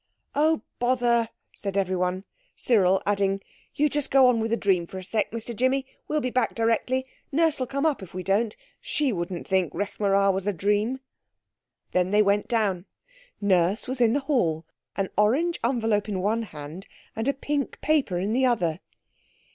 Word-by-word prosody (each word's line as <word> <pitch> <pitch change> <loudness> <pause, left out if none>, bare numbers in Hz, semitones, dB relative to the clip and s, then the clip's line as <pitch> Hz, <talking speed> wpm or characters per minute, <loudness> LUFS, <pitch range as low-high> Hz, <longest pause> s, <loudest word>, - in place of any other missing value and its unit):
"Oh, 310 +2 +2 0.2
bother!" 240 -2 +2 0.3
said 200 -1 -4
everyone. 185 -1 0 0.3
Cyril 195 -5 +3
adding, 195 -1 +1 0.4
"You 300 - +3
just 295 -1 -2
go 270 -1 +6
on 250 -2 +4
with 225 0 -1
the 230 - +1
dream 185 -5 +1
for 190 - -8
a 185 - -6
sec, 210 +3 -1
Mr 230 +1 -6
Jimmy, 260 +3 +1 0.2
we'll 305 0 0
be 255 - -2
back 250 -3 0
directly. 230 +3 +1 0.3
Nurse'll 300 -4 +1
come 275 +4 -1
up 300 -8 +1
if 190 - -10
we 185 0 -5
don't. 210 +4 +1 0.2
She 285 -5 0
wouldn't 175 -1 -4
think 190 -4 +1
Rekh 205 +3 -4
marā 195 -1 +3
was 190 +1 -3
a 205 - +1
dream." 210 +8 0 0.9
Then 180 0 +1
they 210 +2 +4
went 205 +1 +1
down. 205 -6 0 0.5
Nurse 190 +1 +2
was 255 0 -2
in 230 -1 +4
the 285 - +1
hall, 175 - 0 0.3
an 195 -1 -1
orange 285 +12 +2
envelope 225 -4 +1
in 195 -3 -2
one 215 +5 +1
hand, 155 +4 -9 0.3
and 225 +3 -2
a - - +4
pink 285 +1 -3
paper 285 - +1
in 195 +5 -1
the 260 +2 +2
other. 175 -9 0
215 Hz, 180 wpm, -26 LUFS, 190-255 Hz, 0.9 s, go